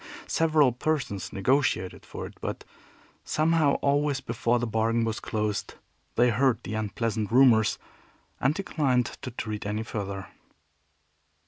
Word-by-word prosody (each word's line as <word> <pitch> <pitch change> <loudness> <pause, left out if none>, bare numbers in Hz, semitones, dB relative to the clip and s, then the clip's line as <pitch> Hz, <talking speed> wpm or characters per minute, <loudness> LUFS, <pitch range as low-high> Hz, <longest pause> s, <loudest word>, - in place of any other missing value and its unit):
Several 155 -5 +3
persons 125 -6 -2
negotiated 100 -3 0
for - - -6
it; - - -9
but, - - -4 0.6
somehow, 155 -2 +2
always 145 0 +2
before 120 -2 0
the 120 - -1
bargain 115 +1 +1
was 110 0 -2
closed 105 -1 -2 0.4
they 120 0 +4
heard 125 +1 +2
the - - -5
unpleasant 110 0 -2
rumors 115 -4 +5 0.6
and 135 +4 +2
declined 140 -10 +1 0.2
to 130 - -5
treat 110 -3 -5
any 105 +2 -2
further. 100 -3 -5
120 Hz, 125 wpm, -27 LUFS, 110-140 Hz, 0.6 s, rumors